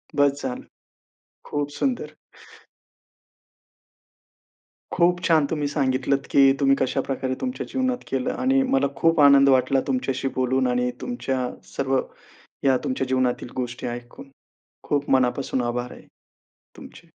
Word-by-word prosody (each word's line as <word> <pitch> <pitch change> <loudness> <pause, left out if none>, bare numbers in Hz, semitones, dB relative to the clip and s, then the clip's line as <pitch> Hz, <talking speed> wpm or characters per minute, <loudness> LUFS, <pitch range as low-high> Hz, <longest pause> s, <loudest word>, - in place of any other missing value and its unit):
बस 145 0 +2
झालं. 125 -2 -4 0.8
खूप 145 -1 -3
सुंदर. 260 -3 -2 2.8
खूप 175 0 +3
छान, 160 -3 +3
तुम्ही 150 -3 -1
सांगितलत 135 -1 0
की 135 -1 +6
तुम्ही 135 -1 +4
कशाप्रकारे 130 0 -1
तुमच्या 255 0 -3
जीवनात 255 -1 0
केलं. 130 -1 -1
आणि 265 +1 +2
मला 270 - +3
खूप 165 -1 +2
आनंद 140 -1 +7
वाटला 130 +1 +3
तुमच्याशी 130 0 -1
बोलून, 130 0 +1
आणि 125 0 0
तुमच्या 130 - -2 0.3
सर्व 135 -1 +1 0.7
या 130 -1 +4
तुमच्या 130 0 -2
जीवनातील 130 -2 0
गोष्टी 125 0 -4
ऐकून. 120 +3 -8 0.6
खूप 145 -1 -1
मनापासून 130 0 +1
आभार 120 +1 -3
आहे - - -14 0.7
तुमचे. - - -13
135 Hz, 120 wpm, -23 LUFS, 130-145 Hz, 2.8 s, आनंद